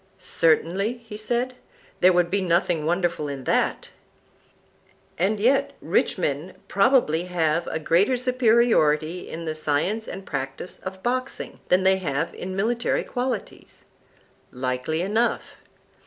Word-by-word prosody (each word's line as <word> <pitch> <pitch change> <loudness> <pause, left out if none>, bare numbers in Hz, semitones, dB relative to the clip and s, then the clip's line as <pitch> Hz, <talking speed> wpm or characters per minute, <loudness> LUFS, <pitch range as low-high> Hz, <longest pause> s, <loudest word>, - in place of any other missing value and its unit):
Certainly, 175 +7 +1
he 210 - -7
said, 240 +4 -1 0.5
there 185 - +6
would 175 -1 +2
be 200 0 +1
nothing 170 -3 +1
wonderful 170 -3 0
in 140 -2 -5
that. - - 0 1.3
And 200 +5 0
yet 255 +6 +2
rich - - +1
men 155 +1 -2
probably 195 - +3
have 170 -2 0
a - - -2
greater 180 +10 +2
superiority 225 - +2
in 165 +1 -6
the 155 - -2
science 155 +9 0
and 195 - -7
practise 135 +6 -5
of 190 0 -8
boxing 255 +2 -3
than 185 +1 +4
they 190 0 +4
have 155 -3 -2
in 185 +1 -6
military 235 +5 0
qualities. 250 +1 -5 0.7
Likely 130 +6 -2
enough. 220 +5 0
180 Hz, 125 wpm, -24 LUFS, 160-220 Hz, 1.3 s, there